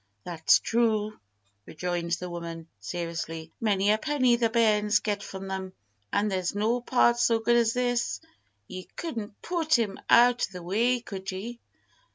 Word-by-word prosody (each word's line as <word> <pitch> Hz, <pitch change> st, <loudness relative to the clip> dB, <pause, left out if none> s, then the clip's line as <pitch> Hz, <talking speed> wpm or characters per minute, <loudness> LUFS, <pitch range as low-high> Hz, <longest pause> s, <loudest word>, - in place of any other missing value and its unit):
"That's 165 Hz, -2 st, +3 dB
true!" 215 Hz, -2 st, 0 dB, 0.5 s
rejoined 175 Hz, 0 st, -3 dB
the 180 Hz, +1 st, -2 dB
woman, 170 Hz, -1 st, -6 dB
seriously. 165 Hz, -, -5 dB
"Many 205 Hz, -2 st, +2 dB
a 215 Hz, -, +2 dB
penny 265 Hz, -5 st, +2 dB
the 235 Hz, -1 st, +1 dB
bairns 215 Hz, -2 st, +3 dB
get 205 Hz, -2 st, -2 dB
from 195 Hz, -1 st, -7 dB
them, 190 Hz, -1 st, -5 dB, 0.4 s
an 205 Hz, +1 st, +1 dB
there's 185 Hz, -2 st, -1 dB
no 225 Hz, +4 st, +1 dB
part 240 Hz, -1 st, +3 dB
so 235 Hz, -1 st, +3 dB
good 230 Hz, +2 st, +2 dB
as 230 Hz, -1 st, +3 dB
this. 245 Hz, -1 st, 0 dB, 0.5 s
Ye 185 Hz, -1 st, -7 dB
couldn't 225 Hz, -11 st, -5 dB
put 325 Hz, -4 st, +2 dB
him 210 Hz, -4 st, -2 dB
out 245 Hz, +1 st, +5 dB
o' -, -, -19 dB
the 180 Hz, -1 st, -7 dB
way, 235 Hz, +7 st, +1 dB
could 195 Hz, -3 st, -6 dB
ye?" 230 Hz, +6 st, -6 dB
210 Hz, 160 wpm, -27 LUFS, 185-235 Hz, 0.5 s, out